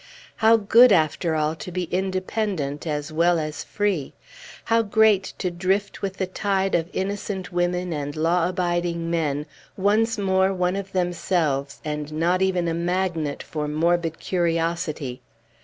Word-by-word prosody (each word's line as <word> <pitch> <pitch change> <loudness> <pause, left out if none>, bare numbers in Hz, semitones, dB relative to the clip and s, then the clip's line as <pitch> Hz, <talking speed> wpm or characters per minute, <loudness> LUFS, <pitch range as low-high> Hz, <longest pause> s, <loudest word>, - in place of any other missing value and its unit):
How 225 0 +5
good, 230 +3 +6
after 160 -1 +2
all, 155 0 +1
to 180 - -7
be 180 +1 -2
independent 185 -5 -2
as 150 0 -3
well 170 +2 +3
as 155 -2 -4
free! 200 -9 -1 0.5
How 230 0 +3
great 210 -2 +3
to 180 - -2
drift 190 +3 -1
with 195 -1 -3
the 190 - 0
tide 195 +1 -1
of 165 0 +1
innocent 190 -1 -3
women 175 0 0
and 145 -1 -4
law 165 +2 +2
abiding 175 -2 -1
men, 150 -3 0 0.3
once 220 +3 +2
more 190 -1 +2
one 180 0 0
of 195 -1 -5
themselves, 170 -6 -1
and 150 0 -4
not 175 +4 +1
even 185 -2 +1
a 165 - 0
magnet 170 -3 -1
for 150 -1 -4
morbid 165 +2 +1
curiosity! 165 -6 -1
175 Hz, 145 wpm, -24 LUFS, 160-190 Hz, 0.5 s, good